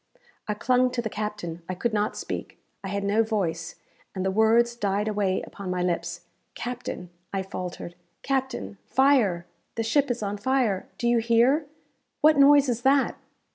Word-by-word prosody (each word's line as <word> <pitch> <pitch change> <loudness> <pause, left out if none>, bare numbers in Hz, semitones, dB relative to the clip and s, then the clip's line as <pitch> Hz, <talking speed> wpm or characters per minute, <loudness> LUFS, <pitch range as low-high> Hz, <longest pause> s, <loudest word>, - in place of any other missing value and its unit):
I 210 - -1
clung 250 +3 +2
to 240 - 0
the 220 - -3
captain 205 -6 -4
I 185 - -2
could 230 +5 -1
not 210 0 0
speak - - -5 0.3
I - - -4
had 200 +1 -2
no 205 +3 +3
voice, 190 -7 -2 0.4
and 190 0 -2
the 190 - +1
words 225 +3 +3
died 205 -2 -1
away 205 -3 0
upon 200 -2 -8
my 180 -1 -1
lips. 170 -1 -2 0.3
"Captain!" 245 -7 -5 0.2
I 195 -1 -2
faltered; 180 -2 -6 0.3
"captain! 260 - -2
fire! 245 -11 +3 0.3
the 225 - -1
ship 280 +5 +2
is 245 -2 -2
on 205 0 -2
fire 230 -3 0
do 240 - -1
you 235 0 +4
hear? 240 +6 +3 0.5
what 310 +1 +6
noise 285 0 +6
is 240 -2 -1
that?" 270 +1 +3
215 Hz, 170 wpm, -26 LUFS, 190-245 Hz, 0.5 s, what